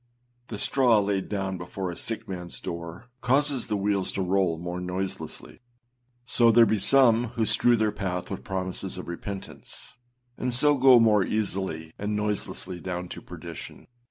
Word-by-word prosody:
The 105 - -6
straw 125 +1 +3
laid 100 -1 -1
down 95 -3 -2
before 90 +1 -4
a - - -7
sick 115 +3 -5
manâs 90 -4 -6
door 85 +8 -7
causes 135 +1 +1
the 105 -2 -1
wheels 100 -1 0
to 95 - -1
roll 90 -2 +1
more 90 +2 -5
noiselessly. 95 +1 -5 0.7
So 120 -1 +4
there 115 +1 +7
be 110 0 +1
some 120 0 +5
who 110 - +2
strew 120 +2 +4
their 110 -2 +1
path 95 -3 -4
with - - -5
promises 95 0 -4
of 90 - -7
repentance, 95 +3 -8 0.5
and 125 -1 0
so 145 +3 +5
go 130 -2 +7
more 105 -3 +4
easily 95 -6 -2
and 105 +1 -2
noiselessly 105 -3 -3
down 90 0 -5
to - - -8
perdition. - - -9
100 Hz, 160 wpm, -26 LUFS, 90-115 Hz, 0.7 s, there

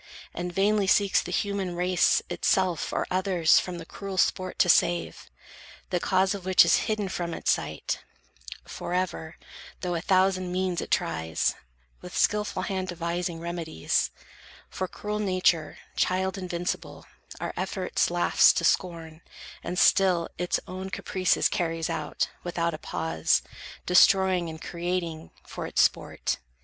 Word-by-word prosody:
And 180 0 -4
vainly 200 +2 +2
seeks 200 0 +4
the 180 - -7
human 195 -2 -1
race, 180 0 +2
itself 185 -4 0
Or - - -1
others 185 -3 +3
from 180 -1 -5
the 165 - -8
cruel 195 +2 -7
sport 185 0 +1
to - - +4
save, 175 0 +2 0.6
The 180 - +1
cause 190 +2 +2
of 200 -2 -6
which 185 0 +6
is - - +4
hidden 215 -2 0
from 175 -2 -3
its - - +1
sight - - -2 0.7
Forever, 175 -2 -3 0.4
though 180 -1 -2
a 170 - -2
thousand 185 0 +2
means 185 -2 -1
it - - -6
tries, 80 -1 0 0.5
With - - -7
skilful 210 -3 +1
hand 190 -1 -2
devising 170 -1 -3
remedies: 170 - -1 0.6
For 185 - -3
cruel 210 +3 -4
Nature, 185 -5 +1 0.2
child 190 +1 0
invincible, 180 -2 -4 0.3
Our - - -4
efforts - - -1
laughs - - +4
to - - -1
scorn, 165 -3 -1 0.4
and 175 +2 -4
still 180 -3 +4
its 180 0 0
own 185 +1 -6
Caprices 185 -1 +1
carries 165 -3 -2
out, 160 -2 -2 0.2
without 170 -1 -1
a 155 - -6
pause, 80 - 0 0.4
Destroying 185 -1 +4
and 160 0 -8
creating, 170 -2 -4 0.2
for - - -6
its - - +3
sport. - - -1
180 Hz, 140 wpm, -27 LUFS, 170-190 Hz, 0.7 s, which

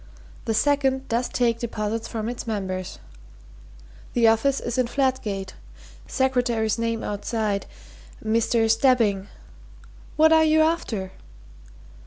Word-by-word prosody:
The 225 - 0
second 270 0 +1
does 235 +2 0
take 235 -2 +1
deposits 225 -1 -3
from 220 -1 -4
its 240 0 -5
members. 190 -4 -4 1.2
The 235 -2 +4
office 265 +5 +2
is 240 +1 -3
in 250 - +2
Fladgate 240 -8 -1 0.5
secretary's 245 -4 0
name 230 -1 -1
outside 210 -1 -2 0.6
Mr. 225 +1 +2
Stebbing. 225 -5 +2 0.9
What 315 +1 +5
are 320 0 +6
you 315 0 +4
after?" 240 - -1
230 Hz, 110 wpm, -24 LUFS, 215-260 Hz, 1.2 s, are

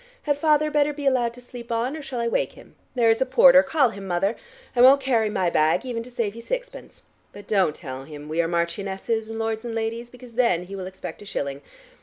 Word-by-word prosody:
Had 290 -1 +1
father 305 0 +2
better 295 0 +2
be 290 0 -7
allowed 250 -3 +2
to 250 - -13
sleep 245 -1 -10
on, 235 +5 -1
or 315 - -6
shall 270 -3 -5
I 235 - 0
wake 230 - 0
him? - - -16 0.2
There 230 -2 +4
is 225 - 0
a - - +4
porter: 265 +1 +7
call 285 -4 +2
him, 200 -3 -8
Mother 190 +5 0 0.4
I 240 - +3
won't 265 +3 +8
carry 240 -5 +1
my 185 -5 0
bag 155 +10 +2
even 240 -3 -3
to 240 - -10
save 230 -4 -2
you 230 - -9
sixpence. - - -6 0.3
But 205 - -12
don't 190 -7 +2
tell 130 -1 -8
him 150 -1 -10
we 160 +2 0
are 165 - -1
marchionesses 195 +6 -2
and 225 - -5
lords 225 0 -2
and 235 -1 -5
ladies, 230 +1 -3
because 250 0 -14
then 230 -8 +2
he 195 +2 -8
will 185 -1 -5
expect 185 -2 -8
a - - -11
shilling. 140 -8 -4
230 Hz, 240 wpm, -24 LUFS, 190-255 Hz, 0.4 s, won't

